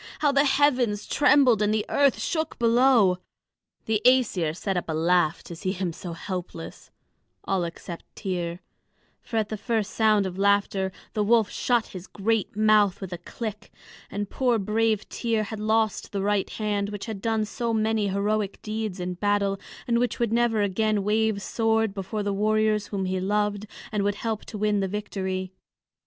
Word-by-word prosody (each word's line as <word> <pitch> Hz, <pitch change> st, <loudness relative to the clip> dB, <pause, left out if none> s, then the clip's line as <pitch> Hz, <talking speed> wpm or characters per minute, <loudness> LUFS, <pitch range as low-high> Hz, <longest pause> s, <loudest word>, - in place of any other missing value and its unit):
How 295 Hz, -2 st, +2 dB
the 280 Hz, +1 st, +3 dB
heavens 260 Hz, -7 st, +2 dB
trembled 265 Hz, -6 st, +4 dB
and 210 Hz, 0 st, +2 dB
the 215 Hz, -1 st, 0 dB
earth 280 Hz, -2 st, +3 dB
shook 320 Hz, -2 st, -2 dB
below! 235 Hz, -5 st, +4 dB, 0.7 s
The 220 Hz, -1 st, 0 dB
Æsir 210 Hz, -11 st, +3 dB
set 195 Hz, 0 st, -2 dB
up 180 Hz, -, -1 dB
a -, -, 0 dB
laugh 170 Hz, 0 st, +2 dB
to 170 Hz, -, -8 dB
see 185 Hz, +3 st, -2 dB
him 180 Hz, -3 st, -3 dB
so 175 Hz, 0 st, -7 dB
helpless 175 Hz, -1 st, -7 dB, 0.5 s
all 190 Hz, -2 st, 0 dB
except 170 Hz, 0 st, -9 dB
Tŷr; 175 Hz, -4 st, -3 dB, 0.6 s
for 225 Hz, -, -4 dB
at 215 Hz, -2 st, 0 dB
the 215 Hz, -, -3 dB
first 220 Hz, -1 st, -1 dB
sound 215 Hz, -3 st, +3 dB
of 185 Hz, 0 st, -5 dB
laughter 200 Hz, -1 st, +2 dB, 0.2 s
the 210 Hz, -, +1 dB
wolf 225 Hz, 0 st, +3 dB
shut 240 Hz, -3 st, +1 dB
his 185 Hz, +1 st, -9 dB
great 210 Hz, 0 st, -1 dB
mouth 215 Hz, -3 st, +4 dB
with 190 Hz, -2 st, -6 dB
a 175 Hz, -, -5 dB
click, 215 Hz, +3 st, -6 dB, 0.4 s
and 205 Hz, 0 st, -3 dB
poor 245 Hz, +2 st, +1 dB
brave 215 Hz, +1 st, 0 dB
Tŷr 225 Hz, -3 st, -1 dB
had 215 Hz, +1 st, -6 dB
lost 220 Hz, 0 st, 0 dB
the 200 Hz, -1 st, -2 dB
right 205 Hz, -1 st, +1 dB
hand 205 Hz, -2 st, -2 dB
which 205 Hz, -1 st, -6 dB
had 220 Hz, -4 st, -6 dB
done 220 Hz, -1 st, 0 dB
so 230 Hz, +2 st, -3 dB
many 220 Hz, -1 st, +1 dB
heroic 200 Hz, +1 st, -1 dB
deeds 215 Hz, -3 st, -3 dB
in 180 Hz, 0 st, -3 dB
battle, 200 Hz, +1 st, 0 dB, 0.3 s
and 235 Hz, -1 st, +2 dB
which 245 Hz, 0 st, 0 dB
would 235 Hz, -2 st, 0 dB
never 230 Hz, -3 st, +2 dB
again 210 Hz, +1 st, +1 dB
wave 215 Hz, 0 st, +1 dB
sword 225 Hz, -1 st, +1 dB
before 200 Hz, +2 st, -4 dB
the 200 Hz, 0 st, -1 dB
warriors 215 Hz, 0 st, +1 dB
whom 195 Hz, -2 st, -3 dB
he 185 Hz, 0 st, -1 dB
loved 205 Hz, +2 st, 0 dB, 0.2 s
and 210 Hz, -, 0 dB
would 200 Hz, 0 st, 0 dB
help 220 Hz, 0 st, -3 dB
to 215 Hz, -, -7 dB
win 210 Hz, 0 st, +1 dB
the 195 Hz, -, 0 dB
victory. 190 Hz, -2 st, -3 dB
210 Hz, 175 wpm, -26 LUFS, 195-225 Hz, 0.7 s, trembled